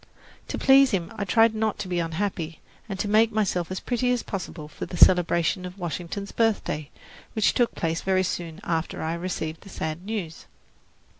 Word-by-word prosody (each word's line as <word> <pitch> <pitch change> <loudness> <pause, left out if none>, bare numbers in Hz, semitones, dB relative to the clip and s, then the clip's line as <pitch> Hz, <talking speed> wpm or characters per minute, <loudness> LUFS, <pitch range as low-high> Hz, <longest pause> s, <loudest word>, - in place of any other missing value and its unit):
To - - -3
please 270 0 +6
him 190 -6 -1
I 200 - -2
tried 225 +3 +4
not 220 -1 0
to - - -5
be 180 -1 -1
unhappy, 165 -1 -2 0.3
and 195 - -3
to 205 - -1
make 215 +2 +4
myself 185 -6 0
as 185 - -3
pretty 245 0 0
as 245 -2 0
possible 180 -6 -5
for 150 - -7
the 175 - -6
celebration 175 0 +4
of 180 +1 -7
Washington's 180 +3 -4
birthday, 200 -10 0 0.4
which 220 - +3
took 240 -2 +1
place 165 0 -1
very 190 0 +2
soon 170 -2 -4
after 165 -1 -2
I 160 +1 -1
received 170 -2 -4
the 195 - -13
sad 160 -1 -4
news. 195 -6 -5
185 Hz, 180 wpm, -26 LUFS, 165-215 Hz, 0.4 s, please